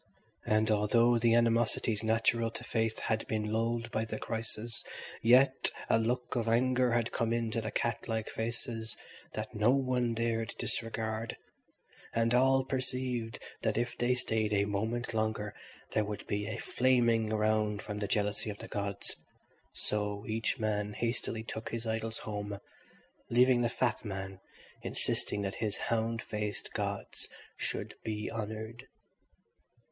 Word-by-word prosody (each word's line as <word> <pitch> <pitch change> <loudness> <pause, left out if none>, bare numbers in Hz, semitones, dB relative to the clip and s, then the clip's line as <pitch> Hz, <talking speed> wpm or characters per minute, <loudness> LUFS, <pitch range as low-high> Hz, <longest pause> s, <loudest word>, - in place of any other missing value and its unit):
And 110 +1 +3
although 115 +3 +4
the 115 0 +4
animosities 115 -2 +3
natural 115 +1 +3
to 115 - -7
faith 110 -2 0
had 110 0 +1
all - - -12
been 105 -1 -1
lulled 115 +1 0
by 110 -2 0
the 110 -1 -4
crisis, 115 0 -3 0.4
yet 130 +3 +5 0.2
a 115 - +5
look 120 +3 0
of 115 -2 0
anger 125 +1 +3
had 120 0 +1
come 115 -1 0
into 115 -1 0
the 110 - -3
cat 115 0 -1
like 110 -1 -1
faces 115 0 -4 0.4
that - - -4
no 105 +2 +3
one 125 -3 +1
dared 115 -1 0
disregard, 110 0 -2 0.8
and 115 0 +3
all 130 +1 +5
perceived 125 -4 -1 0.2
that - - +1
if 120 +1 0
they 120 +1 +2
stayed 110 -3 0
a 100 0 +3
moment 110 +4 -1
longer 110 -1 0 0.4
there 110 - +2
would 105 0 -5
be 105 +2 -2
flaming 120 -3 +3
around 110 -1 +2
them 105 0 -4
the 100 - -1
jealousy 105 +1 +1
of 105 - -5
the - - -8
gods; 100 -1 -3 0.6
so 105 -1 -1
each 110 +4 0
man 105 -2 0
hastily 115 -1 -1
took 110 0 -5
his 115 0 -3
idols 110 0 -1
home, 105 -1 -4 0.7
leaving 125 +1 +5
the 120 - +2
fat 125 0 0
man 95 -2 -5 0.4
insisting 105 - 0
that 100 -1 -2
his 105 -2 +1
hound 115 0 0
faced 105 -1 -3
gods - - -3 0.3
should - - -2
be 105 -1 -3
honoured. 110 +1 -5
115 Hz, 145 wpm, -32 LUFS, 105-120 Hz, 0.8 s, yet